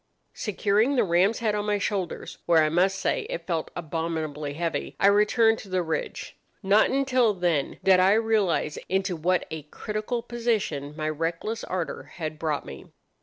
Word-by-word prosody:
"Securing 210 +5 +1
the 250 - +4
ram's 190 +4 +3
head 220 -2 0
on 210 0 -2
my 205 0 +2
shoulders, 195 -3 -3
where 165 -2 +5
I 155 - +2
must 185 +4 +2
say 190 - -1
it 165 - -5
felt 165 -3 -2
abominably 160 -3 -3
heavy, 170 +1 -3
I - - +3
returned 210 +3 +4
to 200 - -11
the 185 -1 0
ridge. 160 -1 -4 0.3
Not 200 +3 +4
until 255 -5 +2
then 175 -6 0
did 190 -1 +6
I 190 +2 +5
realize 215 -9 +1
into 190 -1 0
what 175 +3 +1
a 160 -1 -4
critical 215 - -4
position 220 -12 -2
my 155 -1 -2
reckless 165 +8 -2
ardour 180 -3 -4
had 155 -2 -5
brought 155 -3 -1
me. 70 - -10
185 Hz, 170 wpm, -26 LUFS, 160-210 Hz, 0.3 s, did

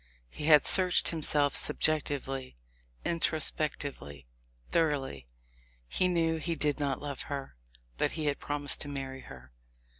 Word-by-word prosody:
He 150 - -6
had 150 -2 +6
searched 185 -2 +6
himself 150 -3 0
subjectively, 135 - -1 0.5
introspectively, 150 - -1 0.5
thoroughly; 135 - -1 0.6
he 185 - 0
knew 165 -2 +1
he 165 +1 -2
did 150 -1 -1
not 140 -2 -1
love 145 -2 -5
her, 140 - -5 0.4
but - - 0
he 155 -2 -3
had 145 -1 -1
promised 145 -1 0
to - - -1
marry 135 -2 -6
her! 65 - -13
145 Hz, 125 wpm, -30 LUFS, 135-155 Hz, 0.6 s, had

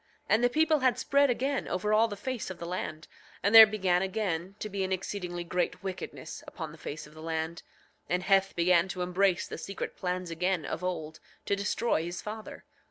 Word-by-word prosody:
9:26 - - -40
And 220 +2 +4
the 245 - +5
people 310 +3 +3
had 255 -2 +3
spread 280 +2 +3
again 265 +3 0
over 210 +3 0
all 220 +2 +5
the 205 - -5
face 255 +1 -4
of 185 - -6
the 170 - -6
land, 160 -3 -4 0.4
and 200 +3 +2
there 225 -1 +12
began 190 -4 +1
again 190 -2 -2
to 215 - -4
be 200 -2 -2
an 190 - -3
exceedingly 180 -2 -3
great 180 +3 -2
wickedness 190 -1 -6
upon 160 -3 -6
the 160 - -14
face 150 +1 -6
of 150 - -16
the 155 - -11
land, 160 +1 -3 0.5
and 180 +1 0
Heth 195 0 +3
began 175 +1 +4
to 185 -1 -3
embrace 180 +1 +1
the - - -7
secret 195 - -5
plans 180 -1 -3
again 175 -1 0
of 165 - -4
old, 160 -4 -3 0.3
to 200 - +1
destroy 205 -1 0
his 175 +1 -5
father. 215 +1 -8
185 Hz, 210 wpm, -29 LUFS, 175-215 Hz, 0.5 s, there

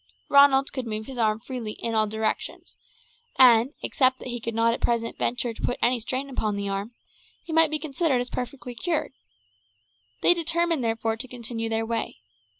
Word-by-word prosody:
Ronald 280 -1 +5
could 260 -3 -4
move 215 0 -4
his 260 -1 -7
arm 215 -1 +2
freely 235 -5 -5
in 230 - -4
all 215 -1 +2
directions, 220 +1 -3 0.6
and, 245 0 +6
except 260 -1 +2
that 255 - -8
he 240 0 -3
could 230 0 -4
not 230 0 +3
at - - -5
present 230 -1 0
venture 245 -1 -1
to - - -12
put 245 - -1
any 245 0 +2
strain 255 +4 -3
upon 220 -6 -2
the 200 0 -3
arm, 200 +4 -4 0.5
he 330 - -7
might 325 -1 +5
be 310 - 0
considered 300 -2 0
as 245 0 -4
perfectly 250 0 -5
cured. 315 +4 -2 1.1
They - - +7
determined, 335 -3 +1
therefore, 225 0 -1
to 255 +3 -4
continue 235 -2 -5
their 225 0 -1
way. 225 - -3
240 Hz, 185 wpm, -25 LUFS, 225-270 Hz, 1.1 s, They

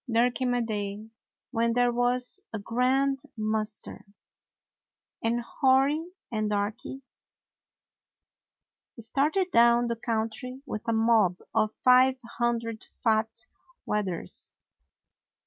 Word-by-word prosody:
There 240 +1 +3
came 250 0 -1
a 245 - +1
day 210 -1 -4 0.4
when 230 -1 +1
there 245 0 +3
was 250 +7 +1
a 220 - -3
grand 260 +5 +1 0.2
muster, 215 0 -3 1.2
and 235 +1 +1
Hori 275 +8 +2 0.2
and 215 -2 -1
Darky 210 +6 -3 2.0
started 300 - 0
down 235 +1 +5
the 235 0 -1
country 230 +3 -3
with 215 -6 -6
a - - +2
mob 220 -5 +3 0.2
of 215 -1 +1
five 255 +1 +6 0.2
hundred 230 -2 -1
fat 220 0 -1 0.4
weth 210 -1 0
ers. 175 -2 -7
235 Hz, 105 wpm, -27 LUFS, 220-250 Hz, 2.0 s, five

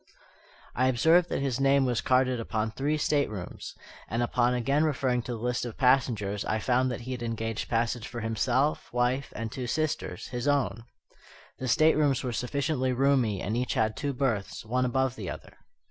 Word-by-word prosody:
I 130 +1 +2
observed 160 +8 +4
that - - -1
his 135 -2 -1
name 135 0 +4
was 125 -3 0
carded 130 -1 +2
upon 110 -1 -2
three 145 +6 -1
staterooms: 110 -12 -2 0.3
and 115 +2 0
upon 120 +1 +1
again 135 +5 +1
referring 130 -5 +1
to 120 +1 -5
the - - -4
list 120 +2 -1
of 120 -3 -6
passengers 120 -6 +2
I 110 - -1
found 125 +3 +1
that 125 -1 -4
he 125 +2 -6
had 125 -1 -4
engaged 115 -1 -3
passage 115 0 0
for 120 -1 -6
himself, 115 +6 0
wife, 125 +2 0
and 110 0 -4
two 130 0 -4
sisters 155 - -2
his 125 +1 -3
own. 120 -6 0 0.7
The 130 - -3
staterooms 150 -1 +3
were 125 -2 -2
sufficiently 130 +1 -1
roomy, 125 -7 +2
and 105 +4 -2
each 125 +1 -1
had 110 0 +1
two 145 - -2
berths, 125 -7 -2
one 125 +3 0
above 130 0 0
the 100 -7 -6
other. - - -9
125 Hz, 180 wpm, -28 LUFS, 115-135 Hz, 0.7 s, observed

